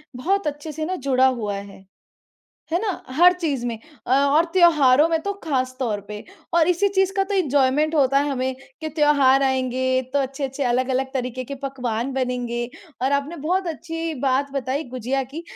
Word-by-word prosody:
बहुत 380 +8 0
अच्छे 295 +1 -4
से 310 +1 -4
ना 370 +2 -2
जुड़ा 260 0 +5
हुआ 220 -6 -2
है। 200 -1 -10 0.9
है 345 - +3
ना? 430 -2 -1 0.3
हर 355 +3 +7
चीज़ 300 -9 -2
में 230 -2 -3 0.3
अ, - - -6
और 280 +4 +4
त्योहारों 305 -5 +5
में 325 -1 +1
तो 400 - -2
ख़ास 255 -4 -1
तौर 220 -6 -1
पे 210 0 -7 0.3
और 335 0 +4
इसी 360 +3 +3
चीज़ 385 -1 +1
का 390 - +3
तो 400 +1 -3
एन्जॉयमेंट 290 -2 +2
होता 275 -2 +3
है 290 +1 0
हमें, 260 -1 -1 0.3
कि 315 - -3
त्योहार 285 -3 +4
आएँगे 260 0 +1
तो 285 - +2
अच्छे-अच्छे, 270 +1 -3
अलग-अलग 260 +2 0
तरीके 255 0 -3
के 280 +3 -6
पकवान 255 -2 -3
बनेंगे 245 -2 -2 0.3
और 270 +2 +1
आपने 280 +4 -1
बहुत 360 +6 -1
अच्छी 330 0 -4
बात 270 +2 +1
बताई 275 +2 -2
गुजिया 255 +2 -2
की, 320 +4 -6
275 Hz, 180 wpm, -22 LUFS, 255-320 Hz, 0.9 s, हर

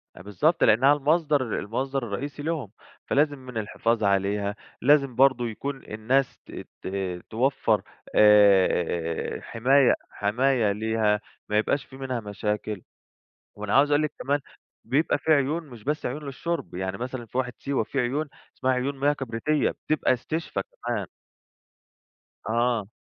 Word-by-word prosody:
آآ، - - -11
بالضبط، 105 - +1
لأنها 130 +6 +6
المصدر 145 -4 +1
المصدر 130 +5 -2
الرئيسي 135 +7 -5
لهم، 150 - -3 0.3
فلازم 145 0 +1
من 125 -2 -8
الحفاظ 110 +1 -1
عليها، 100 +1 +1 0.3
لازم 140 -1 +4
برضه 130 -2 +4
يكون 135 +5 -5
الناس 125 +5 0
ت - - -13 0.3
ت - - -7 0.4
توفّر، 130 +5 +1 0.3
آآ، 95 -5 +4
حماية 130 +3 +3 0.2
حماية 115 +1 +1
ليها، 110 0 +1 0.3
ما 105 - +2
يبقاش 135 +6 +1
في 130 - -13
منها 130 -2 -3
مشاكل. 105 -1 -3 0.7
وأنا 105 0 -4
عاوز 145 +2 +5
أقول 145 +1 +3
لِك 150 - -2
كمان، 140 +2 0 0.4
بيبقى 140 +6 +1
في 160 - -1
عيون 150 +3 +2
مش 115 -4 -12
بس 150 +1 -2
عيون 145 +5 -3
للشرب، 140 - -4
يعني 95 +1 -3
مثلًا 125 0 -5
في 120 - -7
واحة 125 -2 -1
سيوة 140 -4 -1
في 135 - -3
عيون، 135 +5 0 0.3
اسمها 130 0 +1
عيون 135 +2 -2
مياه 145 +2 +3
كبريتية، 135 +2 0
بتبقى 155 -4 0
استشفا 130 -3 -3
كمان. 110 -1 -5 1.4
آه. 115 -2 +1
125 Hz, 140 wpm, -26 LUFS, 105-140 Hz, 1.4 s, لأنها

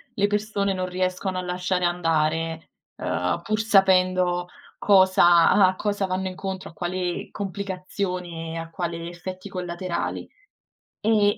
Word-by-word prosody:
le 205 0 +2
persone 205 -1 0
non 185 -1 -2
riescono 185 +1 -2
a - - -1
lasciare 180 0 -1
andare, 165 -1 0 0.3
ehm, 90 - -1
pur 215 +3 -1
sapendo 185 -4 +3 0.3
cosa 185 -4 +6
a 190 -2 +5
cosa 205 -1 -1
vanno 190 0 -2
incontro, 190 0 -5
a - - -21
quale 180 0 -3
complicazione 185 -3 -4
e - - -4
a 165 0 -5
quale 170 0 -4
effetti 185 +3 -7
collaterali. 180 -1 -4 0.7
E 210 -1 +4
185 Hz, 125 wpm, -24 LUFS, 175-195 Hz, 0.7 s, cosa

